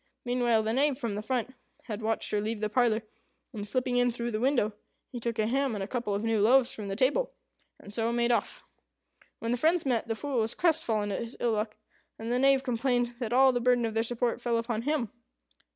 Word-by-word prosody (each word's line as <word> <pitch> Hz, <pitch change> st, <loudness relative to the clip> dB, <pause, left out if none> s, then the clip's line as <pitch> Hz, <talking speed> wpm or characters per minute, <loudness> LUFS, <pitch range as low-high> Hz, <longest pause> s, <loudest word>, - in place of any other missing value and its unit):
Meanwhile, 240 Hz, -2 st, +2 dB
the 220 Hz, +1 st, -1 dB
Knave, 275 Hz, +1 st, +2 dB
from 235 Hz, -6 st, -3 dB
the 205 Hz, -, -3 dB
front, 250 Hz, +2 st, -2 dB, 0.3 s
had 215 Hz, -2 st, -5 dB
watched 220 Hz, +1 st, -1 dB
her 210 Hz, -, +1 dB
leave 215 Hz, +1 st, -3 dB
the 215 Hz, 0 st, -1 dB
parlour, 230 Hz, -1 st, +2 dB, 0.5 s
and 210 Hz, -2 st, -5 dB
slipping 250 Hz, +3 st, 0 dB
in 245 Hz, 0 st, +4 dB
through 235 Hz, 0 st, -3 dB
the 215 Hz, -, -1 dB
window, 245 Hz, -4 st, +2 dB, 0.4 s
he 245 Hz, -, -5 dB
took 235 Hz, -1 st, -3 dB
a 215 Hz, -, +2 dB
ham 265 Hz, +1 st, 0 dB
and 200 Hz, -, -3 dB
a -, -, -4 dB
couple 235 Hz, -4 st, -2 dB
of 205 Hz, -, -2 dB
new 225 Hz, -2 st, +1 dB
loaves 250 Hz, +3 st, +5 dB
from 210 Hz, -2 st, -6 dB
the 195 Hz, -, -3 dB
table, 270 Hz, -, +1 dB, 0.4 s
and 200 Hz, -, -10 dB
so 225 Hz, +1 st, 0 dB
made 235 Hz, 0 st, +1 dB
off. 235 Hz, -, -1 dB, 0.7 s
When 230 Hz, -, -3 dB
the 245 Hz, -, +1 dB
friends 325 Hz, +3 st, +2 dB
met, 245 Hz, -3 st, 0 dB
the 225 Hz, -, -1 dB
Fool 275 Hz, +1 st, -2 dB
was 225 Hz, +1 st, -1 dB
crestfallen 225 Hz, -, +1 dB
at 195 Hz, -, -2 dB
his 235 Hz, +1 st, -7 dB
ill 240 Hz, -, +1 dB
luck, 215 Hz, 0 st, -2 dB, 0.4 s
and 225 Hz, +1 st, -4 dB
the 245 Hz, -, +2 dB
Knave 270 Hz, 0 st, +4 dB
complained 245 Hz, -1 st, 0 dB
that 235 Hz, -3 st, -3 dB
all 265 Hz, +2 st, +6 dB
the 245 Hz, -1 st, -1 dB
burden 245 Hz, -1 st, +3 dB
of 225 Hz, -, -2 dB
their 225 Hz, -, +2 dB
support 240 Hz, +1 st, -1 dB
fell 235 Hz, -1 st, +1 dB
upon 230 Hz, -1 st, -2 dB
him. 265 Hz, -5 st, -1 dB
235 Hz, 230 wpm, -29 LUFS, 220-250 Hz, 0.7 s, all